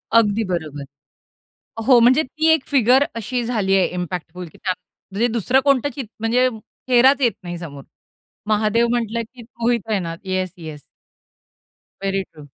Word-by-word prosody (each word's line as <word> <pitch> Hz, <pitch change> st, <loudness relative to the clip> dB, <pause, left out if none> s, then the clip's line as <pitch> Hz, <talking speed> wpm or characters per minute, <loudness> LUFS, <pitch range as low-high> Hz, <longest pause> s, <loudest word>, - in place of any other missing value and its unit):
अगदी 220 Hz, -1 st, +4 dB
बरोबर. 160 Hz, -6 st, -4 dB, 1.0 s
हो, 250 Hz, -3 st, +7 dB
म्हणजे 260 Hz, +6 st, +5 dB
ती 310 Hz, +5 st, -2 dB
एक 305 Hz, -4 st, +1 dB
फिगर 265 Hz, 0 st, +4 dB
अशी 240 Hz, +2 st, -3 dB
झाली 210 Hz, -5 st, +1 dB
आहे 185 Hz, -, +3 dB
इम्पॅक्टफुल 180 Hz, 0 st, -5 dB
की 155 Hz, -, -17 dB
त्यात 185 Hz, -3 st, -2 dB, 0.4 s
म्हणजे 220 Hz, +5 st, +1 dB
दुसरं 245 Hz, +4 st, +2 dB
कोणतंच 280 Hz, -1 st, +2 dB
ची 275 Hz, -, -3 dB, 0.2 s
म्हणजे 245 Hz, +3 st, +2 dB, 0.4 s
चेहराच 260 Hz, +3 st, +5 dB
येत 240 Hz, -3 st, +4 dB
नाही 175 Hz, 0 st, -5 dB
समोर. 145 Hz, -5 st, -9 dB, 0.6 s
महादेव 220 Hz, +2 st, +2 dB
म्हटलं 235 Hz, -1 st, -1 dB
की 250 Hz, -, -12 dB
Mohit 235 Hz, -1 st, -2 dB
Raina, 175 Hz, -6 st, -1 dB
yes 185 Hz, -1 st, -2 dB
yes. 155 Hz, -4 st, -9 dB, 1.2 s
Very 195 Hz, 0 st, 0 dB
true. 150 Hz, -4 st, -15 dB
225 Hz, 150 wpm, -21 LUFS, 185-245 Hz, 1.2 s, हो